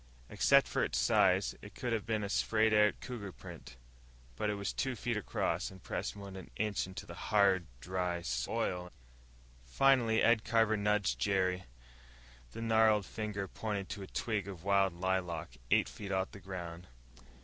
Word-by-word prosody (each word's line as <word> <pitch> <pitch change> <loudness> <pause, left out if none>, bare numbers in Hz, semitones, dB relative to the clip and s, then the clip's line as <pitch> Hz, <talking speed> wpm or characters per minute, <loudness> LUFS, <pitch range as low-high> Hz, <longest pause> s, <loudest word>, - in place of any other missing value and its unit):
Except - - +5
for - - 0
its - - -1
size, - - +3
it - - -12
could 120 -2 -2
have 110 -1 -2
been 110 -2 0
a - - -2
splayed 110 +2 +2
out 105 0 +5
cougar 110 -6 -6
print. - - -11 0.6
But 105 - -1
it 105 - 0
was 100 -1 -3
two 130 -1 -1
feet 115 +1 -2
across, 105 - -1
and 95 -2 -14
pressed - - -3
more 100 -1 -8
than 95 -2 -8
an - - -22
inch 105 -2 -1
into 95 - -8
the - - -9
hard, 100 -5 +2
dry 90 +2 -2
soil. 85 +6 -2 0.7
Finally 115 - +3
Ed 115 -2 +4
Carver 110 -1 +3
nudged 105 -1 +1
Jerry. 95 -2 +1 0.9
The 115 - -6
gnarled 110 -2 +4
finger 105 -2 -4
pointed 100 -1 -4
to 100 - -5
a 95 - -7
twig 105 -2 -2
of 90 -4 -8
wild 100 -1 +3
lilac 85 -7 -2
eight - - +4
feet 100 -2 -7
off 95 0 0
the 100 - -10
ground. 90 -2 -7
100 Hz, 170 wpm, -33 LUFS, 95-110 Hz, 0.9 s, Except